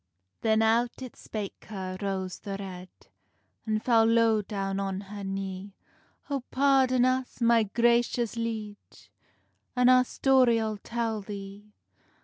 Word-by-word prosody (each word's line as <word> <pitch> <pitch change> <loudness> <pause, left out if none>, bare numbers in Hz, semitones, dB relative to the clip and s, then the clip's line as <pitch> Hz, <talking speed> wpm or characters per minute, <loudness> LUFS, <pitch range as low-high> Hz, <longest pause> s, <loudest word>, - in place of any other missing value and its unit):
Then 220 -1 +3
out 235 +3 +1
it 255 - -9
spake 210 -3 -7
her, 190 -3 -6
Rose 190 -2 -3
the 195 -1 -5
Red, 185 -2 -8 0.8
An 215 0 +1
fell 225 -1 +4
low 230 -1 +3
down 195 -1 -3
on 195 -1 -2
her 200 0 -8
knee: 195 0 -5 0.5
"Oh, 280 -2 -2
pardon 260 -2 +3
us, 255 -1 -1
my 235 -1 +4
gracious 235 +2 +1
liege, 220 -3 -6 0.6
An 250 0 +4
our 255 0 +6
story 255 -2 +3
I'll 220 -1 -2
tell 230 -1 -3
thee. 200 +1 -9
220 Hz, 130 wpm, -28 LUFS, 195-240 Hz, 0.8 s, our